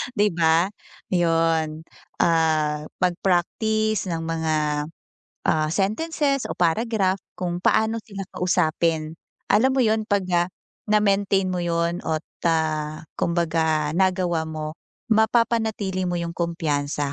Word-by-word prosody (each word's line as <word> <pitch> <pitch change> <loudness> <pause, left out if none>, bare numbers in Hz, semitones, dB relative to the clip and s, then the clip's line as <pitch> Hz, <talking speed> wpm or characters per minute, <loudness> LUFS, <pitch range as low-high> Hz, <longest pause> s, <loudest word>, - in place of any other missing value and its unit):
'di 210 -1 +3
ba, 165 +2 +3 0.4
'yun. 165 -2 +1 0.4
Ah, 155 -2 +2 0.2
magpraktis 195 +4 +1
ng 165 -1 -2
mga, 160 -1 -1 0.9
ah, 155 -1 +2
sentences 275 - 0
o - - -2
paragraph 190 +2 +1 0.2
kung 175 -1 -2
paano 220 +1 +2
sila 200 -2 -7
kausapin. 165 -3 +1 0.4
Alam 225 +6 +4
mo - - +4
'yun, 220 0 +2
'pag, 200 -2 +1
ah, 175 +1 +2 0.4
na-maintain 200 -2 +3
mo 180 -1 -1
'yun 170 +1 0
at, 155 0 -2 0.2
ah, 155 -2 -1 0.2
kumbaga 160 -3 +1
nagawa 180 -3 +1
mo, 155 -1 -5 0.4
mapapanatili 220 -4 +1
mo 175 - -1
'yung 170 0 -3
kumpiyansa, 145 -4 -1
175 Hz, 110 wpm, -23 LUFS, 160-200 Hz, 0.9 s, Alam